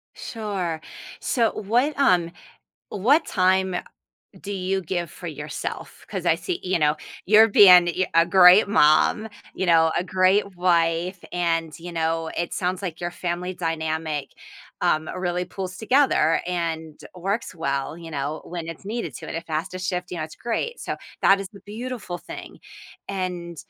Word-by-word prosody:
Sure. 195 -8 -4 0.4
So 230 -3 +1
what 245 +9 0
um, 180 -11 +3 0.6
what 275 - +3
time 190 -1 +2 0.7
do 205 - -6
you 190 0 -1
give 175 -1 -3
for - - -7
yourself? - - -6
'Cause - - -5
I - - +5
see 365 -1 -4
you 185 -1 +1
know, 150 -1 +2 0.3
you're 215 +3 +7
being 180 -4 +8
yeah, 180 +2 0
a 165 0 +5
great 185 +3 +7
mom, 200 +5 +4 0.3
you - - -2
know, 165 -2 +4
a - - +2
great 190 +1 +2
wife, 175 +1 +1
and, 165 -2 0
you 175 +1 -8
know, 165 0 -1
it 170 - -2
sounds 185 +1 -2
like 175 -4 -5
your 175 0 -3
family 180 +1 -3
dynamic, 160 -3 -3 0.5
um, 155 0 +1
really 180 0 -1
pulls 185 0 -6
together 230 - +3
and 165 -3 -3 0.2
works 195 +4 -3
well, 140 -2 -2
you 165 -1 -10
know, 150 +1 -3
when 170 -2 -6
it's 165 +2 -8
needed 210 - -4
to, - - -8
in - - -4
a - - -2
faster 165 +3 -4
to 185 - -6
shift, 180 -1 -3
you 180 - -5
know, 155 - -2
it's 155 - -11
great. 240 - -3
So - - -4 0.3
that 195 0 +6
is 195 - -6
the 200 - -14
beautiful 220 -4 -6
thing, - - -10 0.5
and, 180 -3 -4
180 Hz, 165 wpm, -24 LUFS, 165-195 Hz, 0.7 s, being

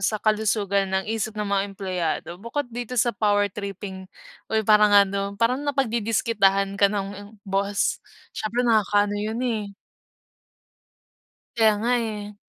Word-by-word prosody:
sa 205 +2 +1
kalusugan 210 -2 +1
ng 190 0 -1
isip 220 0 -3
ng 210 - -2
mga 200 -1 +1
empleyado. 185 -6 -3
Bukod 235 +6 -3
dito 245 +1 -5
sa 240 0 +2
power 205 -1 +1
tripping 195 -2 -7 0.4
o 220 - -1
'yong 220 - +1
parang 210 0 +6 0.2
ano, 200 +1 -3
parang 235 +5 +1
napagdidiskitahan 225 -7 +1
ka 200 - +6
ng 200 +1 -5
boss, 200 +1 0 0.3
siyempre 235 +3 -2
nakakaano 205 -3 +3
'yon, 220 +2 -3
eh. 215 -5 -2 1.9
Kaya 220 -2 +5
nga, 240 - +1
eh. 210 -3 -5
210 Hz, 135 wpm, -24 LUFS, 200-225 Hz, 1.9 s, parang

